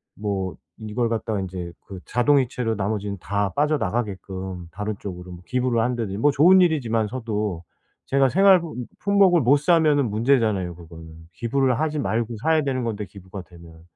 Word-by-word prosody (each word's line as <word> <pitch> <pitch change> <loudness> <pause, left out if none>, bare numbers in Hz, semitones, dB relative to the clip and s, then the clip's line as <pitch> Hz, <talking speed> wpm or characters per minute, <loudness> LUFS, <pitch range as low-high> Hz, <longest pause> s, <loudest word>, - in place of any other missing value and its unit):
뭐 100 -3 -3 0.2
이걸 115 +2 -2
갖다가 110 -2 -2
인제 90 -2 -6 0.2
그 95 -2 -8
자동이체로 125 -3 +1
나머지는 100 0 -3
다 100 +2 -1
빠져나가게끔 95 - -2
다른 105 +2 -4
쪽으로 90 -2 -8
기부를 125 -2 0
한다든지 115 -5 -2
뭐 145 +6 +3
좋은 180 +7 +6
일이지만 120 -10 +1
서도 105 -7 -3 0.4
제가 135 -1 +2
생활 190 +1 +5 0.4
품목을 195 -4 +4
못 135 +4 +4
사면은 150 -6 +3
문제잖아요, 110 -7 +1
그거는. 80 -1 -13
기부를 125 +6 0
하지 155 -1 -1
말고 115 -2 -1
사야 160 -1 +3
되는 130 -3 -1
건데 105 -3 -3
기부가 95 0 -10
되면. 85 -1 -16
110 Hz, 355 characters per minute, -23 LUFS, 95-135 Hz, 0.4 s, 좋은